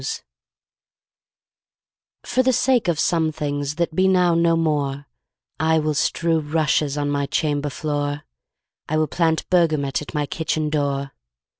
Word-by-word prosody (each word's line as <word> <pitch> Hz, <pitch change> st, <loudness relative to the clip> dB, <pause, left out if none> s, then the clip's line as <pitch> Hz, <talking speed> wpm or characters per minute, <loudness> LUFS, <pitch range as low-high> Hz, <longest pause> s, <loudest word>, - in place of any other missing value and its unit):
ROSEMARY -, -, -4 dB, 2.0 s
For 255 Hz, -, +1 dB
the 260 Hz, 0 st, +2 dB
sake 245 Hz, -4 st, +2 dB
of 165 Hz, -3 st, 0 dB
some 160 Hz, -2 st, +1 dB
things 145 Hz, -1 st, -3 dB
That 170 Hz, 0 st, -1 dB
be 185 Hz, +2 st, +3 dB
now 180 Hz, -2 st, +3 dB
no 165 Hz, 0 st, +3 dB
more 145 Hz, -3 st, -1 dB, 0.5 s
I 160 Hz, +1 st, +3 dB
will 155 Hz, -1 st, 0 dB
strew 165 Hz, +3 st, +1 dB
rushes 150 Hz, -1 st, 0 dB
On 145 Hz, 0 st, -1 dB
my 140 Hz, -1 st, -1 dB
chamber 145 Hz, -1 st, -1 dB
floor, 145 Hz, 0 st, -3 dB, 0.7 s
I 155 Hz, -, +1 dB
will 155 Hz, -, +2 dB
plant 160 Hz, +1 st, 0 dB
bergamot 155 Hz, -7 st, +2 dB
At 150 Hz, -, -9 dB
my 150 Hz, -1 st, 0 dB
kitchen 155 Hz, 0 st, -2 dB
door. 140 Hz, -2 st, -1 dB
155 Hz, 145 wpm, -22 LUFS, 145-165 Hz, 2.0 s, be